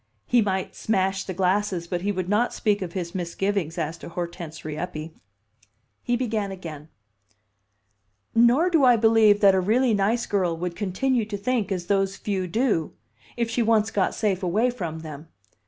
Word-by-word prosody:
He 245 Hz, -1 st, +3 dB
might 190 Hz, -2 st, -2 dB
smash 190 Hz, -2 st, 0 dB
the 190 Hz, -, -4 dB
glasses, 190 Hz, -1 st, 0 dB
but 175 Hz, 0 st, -3 dB
he 205 Hz, +2 st, 0 dB
would 185 Hz, -3 st, -3 dB
not 210 Hz, +5 st, +1 dB
speak 210 Hz, -2 st, +1 dB
of 175 Hz, -3 st, -5 dB
his 175 Hz, -2 st, -4 dB
misgivings 185 Hz, -1 st, -2 dB
as 165 Hz, 0 st, -3 dB
to -, -, -9 dB
Hortense 170 Hz, -2 st, -6 dB
Rieppe. 155 Hz, +1 st, -5 dB, 0.9 s
He 240 Hz, -, 0 dB
began 220 Hz, -5 st, -2 dB
again, 160 Hz, -5 st, -8 dB, 1.4 s
"Nor 245 Hz, +10 st, +4 dB
do 325 Hz, -5 st, +4 dB
I 250 Hz, -2 st, +7 dB
believe 220 Hz, -2 st, +4 dB
that 200 Hz, -2 st, +7 dB
a 190 Hz, -, +3 dB
really 230 Hz, +6 st, +2 dB
nice 215 Hz, +4 st, +1 dB
girl 180 Hz, -5 st, 0 dB
would 175 Hz, 0 st, -4 dB
continue 225 Hz, +5 st, 0 dB
to 210 Hz, -1 st, -5 dB
think 215 Hz, -1 st, -1 dB
as 180 Hz, -2 st, -2 dB
those 195 Hz, 0 st, +1 dB
few 190 Hz, -3 st, -2 dB
do, 210 Hz, -, 0 dB, 0.4 s
if 235 Hz, -1 st, 0 dB
she 235 Hz, -, 0 dB
once 220 Hz, -1 st, +2 dB
got 195 Hz, -2 st, 0 dB
safe 200 Hz, -4 st, 0 dB
away 210 Hz, +7 st, +1 dB
from 165 Hz, -9 st, -5 dB
them. 155 Hz, 0 st, -9 dB
195 Hz, 170 wpm, -24 LUFS, 175-220 Hz, 1.4 s, I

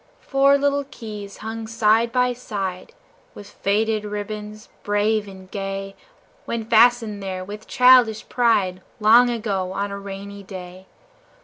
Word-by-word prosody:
Four 275 Hz, 0 st, +3 dB
little 285 Hz, 0 st, 0 dB
keys 210 Hz, -5 st, -8 dB
hung 225 Hz, 0 st, -5 dB
side 225 Hz, +1 st, +2 dB
by 250 Hz, 0 st, +2 dB
side, 195 Hz, -6 st, -5 dB, 0.4 s
With 205 Hz, -, -10 dB
faded 215 Hz, +2 st, 0 dB
ribbons, 210 Hz, +1 st, -6 dB
brave 205 Hz, +1 st, 0 dB
and 190 Hz, -1 st, -12 dB
gay 195 Hz, 0 st, -5 dB, 0.5 s
When 230 Hz, -1 st, -3 dB
fastened 230 Hz, -2 st, +3 dB
there, 185 Hz, -1 st, -5 dB
with 210 Hz, +2 st, -9 dB
childish 250 Hz, -4 st, +5 dB
pride, 200 Hz, -7 st, +1 dB, 0.2 s
Long 230 Hz, +3 st, +6 dB
ago, 200 Hz, -6 st, -2 dB
on 200 Hz, +1 st, -3 dB
a 200 Hz, -, -5 dB
rainy 200 Hz, 0 st, -8 dB
day. 185 Hz, -1 st, -10 dB
210 Hz, 130 wpm, -22 LUFS, 195-230 Hz, 0.5 s, Long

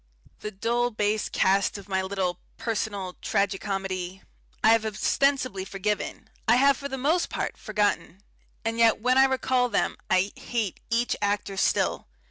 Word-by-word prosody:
The 210 Hz, -, -5 dB
dull 235 Hz, +4 st, 0 dB
base 215 Hz, -1 st, 0 dB
caste 195 Hz, +2 st, +2 dB
of 200 Hz, -, -11 dB
my 190 Hz, -1 st, 0 dB
little 190 Hz, -2 st, -2 dB, 0.2 s
personal 205 Hz, -5 st, -3 dB
tragi 200 Hz, -1 st, 0 dB
comedy 190 Hz, -2 st, -4 dB, 0.4 s
I 220 Hz, -, +6 dB
have 225 Hz, 0 st, +5 dB
ostensibly 255 Hz, 0 st, +1 dB
forgiven, 200 Hz, +3 st, -3 dB, 0.2 s
I 230 Hz, -, +6 dB
have 275 Hz, +2 st, +5 dB
for 280 Hz, +1 st, -6 dB
the 270 Hz, -, -4 dB
most 310 Hz, +7 st, +1 dB
part -, -, -3 dB
forgotten 205 Hz, -2 st, -1 dB, 0.4 s
and 225 Hz, 0 st, -1 dB
yet 230 Hz, -2 st, +5 dB
when 250 Hz, +3 st, +3 dB
I 270 Hz, -, +8 dB
recall 260 Hz, -1 st, +1 dB
them -, -, 0 dB
I 190 Hz, +2 st, +2 dB
hate 225 Hz, -6 st, -3 dB
each 235 Hz, +1 st, +1 dB
actor 205 Hz, -1 st, -1 dB
still. 190 Hz, -, +1 dB
210 Hz, 155 wpm, -26 LUFS, 195-240 Hz, 0.4 s, I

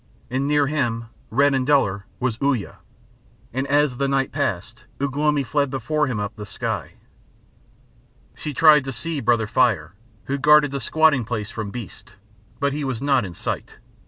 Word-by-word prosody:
And 135 Hz, +2 st, 0 dB
near 145 Hz, -1 st, +3 dB
him, 120 Hz, -6 st, -1 dB, 0.2 s
red 140 Hz, +4 st, +3 dB
and 130 Hz, -1 st, +1 dB
duller, 100 Hz, -9 st, +2 dB
was 125 Hz, -3 st, -1 dB
Uya, 130 Hz, -, -1 dB, 0.7 s
and 130 Hz, +2 st, -2 dB
as 145 Hz, -2 st, +2 dB
the 140 Hz, +1 st, 0 dB
night 135 Hz, -1 st, 0 dB
passed 115 Hz, -, -3 dB
Ugh 140 Hz, -1 st, -2 dB
lomi 150 Hz, -1 st, +2 dB
fled 140 Hz, +3 st, 0 dB
before 145 Hz, +4 st, -1 dB
him 120 Hz, -5 st, -2 dB
up 105 Hz, +1 st, -4 dB
the 105 Hz, -, -7 dB
sky. -, -, -4 dB, 1.4 s
She 150 Hz, -, -5 dB
tried 150 Hz, 0 st, +6 dB
to 135 Hz, -, -3 dB
see 165 Hz, +4 st, -3 dB
Brother 115 Hz, -3 st, +2 dB
Fire, 105 Hz, -9 st, +1 dB, 0.3 s
who 140 Hz, +1 st, -2 dB
guarded 150 Hz, 0 st, +5 dB
the 140 Hz, -, -3 dB
squatting 155 Hz, 0 st, +3 dB
place 110 Hz, -2 st, -4 dB
from 110 Hz, -3 st, -5 dB
beasts, 105 Hz, -4 st, -9 dB, 0.4 s
but 140 Hz, 0 st, 0 dB
he 150 Hz, 0 st, -3 dB
was 130 Hz, -4 st, -2 dB
not 135 Hz, -2 st, +2 dB
in 90 Hz, -3 st, -7 dB
sight. -, -, -5 dB
135 Hz, 170 wpm, -22 LUFS, 115-145 Hz, 1.4 s, tried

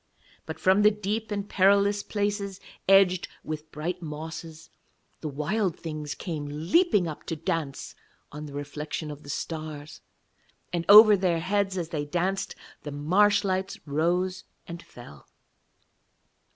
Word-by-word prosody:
But -, -, -6 dB
from 190 Hz, +2 st, +4 dB
the 210 Hz, -, +7 dB
deep 210 Hz, +1 st, -3 dB
and 200 Hz, -1 st, -3 dB
perilous 200 Hz, +1 st, +3 dB
places, 205 Hz, -2 st, -2 dB, 0.3 s
edged 190 Hz, -2 st, +5 dB, 0.2 s
with 155 Hz, 0 st, -6 dB
bright 170 Hz, +4 st, -4 dB
mosses, 160 Hz, +1 st, -8 dB, 0.5 s
the 155 Hz, -, -5 dB
Wild 170 Hz, +6 st, -1 dB
Things 155 Hz, -3 st, -5 dB
came 155 Hz, -5 st, -5 dB
leaping 175 Hz, -, +2 dB
up 155 Hz, -, -7 dB
to 165 Hz, -, -2 dB
dance 160 Hz, -4 st, -3 dB, 0.4 s
on 150 Hz, +1 st, -7 dB
the 140 Hz, -, -10 dB
reflection 150 Hz, +2 st, -5 dB
of 145 Hz, 0 st, -9 dB
the 145 Hz, -, -13 dB
stars, 155 Hz, -1 st, -6 dB, 0.7 s
and 170 Hz, -1 st, -1 dB
over 210 Hz, +1 st, +10 dB
their 180 Hz, -3 st, +1 dB
heads 195 Hz, +1 st, 0 dB
as 170 Hz, -3 st, -3 dB
they 155 Hz, -4 st, -2 dB
danced 185 Hz, +5 st, -2 dB, 0.3 s
the 150 Hz, -, -7 dB
marsh 185 Hz, +10 st, +3 dB
lights 190 Hz, -1 st, -1 dB
rose 175 Hz, +5 st, 0 dB, 0.2 s
and 170 Hz, 0 st, -7 dB
fell. 95 Hz, -, -14 dB
170 Hz, 140 wpm, -27 LUFS, 150-195 Hz, 0.7 s, over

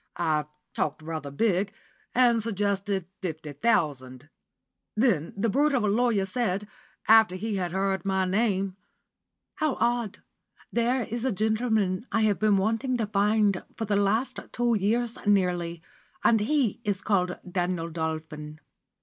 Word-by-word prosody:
I 155 Hz, -3 st, +1 dB, 0.3 s
talked 155 Hz, +1 st, -2 dB
rather 155 Hz, -3 st, -5 dB
big, 195 Hz, +5 st, +1 dB, 0.4 s
and 240 Hz, -2 st, +4 dB
suggested 200 Hz, -3 st, -1 dB, 0.2 s
fifty 160 Hz, -5 st, -5 dB
thousand. 145 Hz, -, 0 dB, 0.7 s
Then 215 Hz, -, +2 dB
the 220 Hz, +4 st, +1 dB
brute 285 Hz, +6 st, +2 dB
of 245 Hz, -, +1 dB
a -, -, +2 dB
lawyer 215 Hz, -1 st, +2 dB
said, 205 Hz, -2 st, -1 dB, 0.4 s
after 220 Hz, -4 st, +6 dB
he 210 Hz, +2 st, -2 dB
had 180 Hz, -2 st, -2 dB
heard 190 Hz, -1 st, 0 dB
my 190 Hz, -1 st, +1 dB
name, 195 Hz, -1 st, 0 dB, 0.8 s
'How 310 Hz, -4 st, +1 dB
odd. 235 Hz, -4 st, 0 dB
Now -, -, -29 dB, 0.5 s
there 240 Hz, +2 st, +1 dB
is 230 Hz, +1 st, -4 dB
a 260 Hz, -, +1 dB
gentleman 220 Hz, -1 st, 0 dB
I 225 Hz, -, +2 dB
have 215 Hz, -2 st, +2 dB
been 215 Hz, -2 st, +4 dB
wanting 225 Hz, +6 st, 0 dB
to 225 Hz, -, 0 dB
find 205 Hz, -1 st, +2 dB
for 225 Hz, -, -3 dB
the 205 Hz, -1 st, 0 dB
last 205 Hz, +6 st, +1 dB
two 240 Hz, -1 st, +1 dB
years 230 Hz, +3 st, 0 dB
nearly, 175 Hz, -4 st, +1 dB, 0.4 s
and 225 Hz, -, +5 dB
he 235 Hz, 0 st, +1 dB
is 205 Hz, -3 st, -1 dB
called 180 Hz, -3 st, +1 dB
Daniel 175 Hz, -2 st, -2 dB
Dolphin! 155 Hz, -1 st, -5 dB
200 Hz, 145 wpm, -27 LUFS, 180-225 Hz, 0.8 s, after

